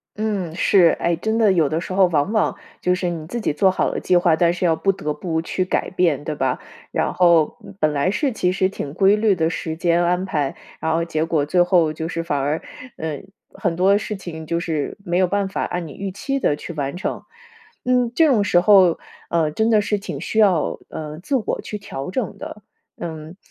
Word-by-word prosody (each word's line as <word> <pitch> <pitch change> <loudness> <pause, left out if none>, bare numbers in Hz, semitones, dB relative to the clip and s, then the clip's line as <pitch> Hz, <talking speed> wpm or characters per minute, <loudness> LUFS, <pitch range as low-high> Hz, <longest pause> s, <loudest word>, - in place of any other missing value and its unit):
嗯， 200 -6 -2
是。 180 -2 +4
诶， 170 0 +1
真 220 +6 -1
的 215 -4 +4
有 160 -6 +2
的 160 +1 -1
时 185 - -6
候 190 -1 +5
往 160 +3 0
往 215 - +1 0.3
就 180 0 +2
是 180 -1 -2
你 160 -2 -5
自 235 +6 -4
己 180 - -1
做 190 +6 +3
好 185 - 0
了 - - -3
计 180 - +3
划， 170 -2 +3
但 170 +1 +3
是 180 +1 -2
要 165 - +3
不 195 +5 +1
得 150 -5 -3
不 160 -2 -2
去 185 +2 -2
改 185 - -1
变， 165 -6 +1
对 155 - -3
吧？ 130 -2 -1 0.3
然 - - 0
后， 170 -4 +3
嗯， - - -12
本 155 -1 +2
来 145 +6 +1
是 260 +7 0
其 180 -5 0
实 185 0 +1
挺 145 -7 -6
规 195 +3 +4
律 210 -2 +2
的 160 -1 +1
时 160 -1 -4
间 170 +1 +2
安 180 +2 +1
排， 145 -7 -1 0.2
然 160 - -1
后 165 +1 +1
结 160 -1 -1
果 160 -3 0
最 175 +4 +2
后 175 -3 +3
就 160 +1 -4
是 165 0 -3
反 145 -4 -1
而， 145 +4 -1 0.4
嗯， 155 -1 -5 0.3
很 175 -3 -2
多 195 +3 +4
事 210 0 -4
情 165 -4 -8
就 170 0 0
是 155 -4 -3
没 175 0 0
有 185 - +3
办 200 +1 0
法 - - -2
按 175 -2 -3
你 145 - -9
预 195 -1 -5
期 275 +8 -3
的 150 - +1
去 170 - -8
完 140 -1 -3
成。 - - -3 0.6
嗯， 250 -2 +2
这 325 -1 +5
种 225 -7 +3
时 175 -3 +3
候， 185 -2 +5 0.3
呃， 160 -3 +1
真 220 +8 +1
的 215 -2 +4
是 210 0 0
挺 200 - -6
需 220 - -2
要， 190 -7 +3
呃， 155 0 -7
自 270 +10 -2
我 235 - -1
去 210 - -6
调 135 -7 -6
整 245 0 -3
的。 210 - -8 0.4
嗯， 160 0 -7
175 Hz, 250 characters per minute, -21 LUFS, 160-195 Hz, 0.6 s, 候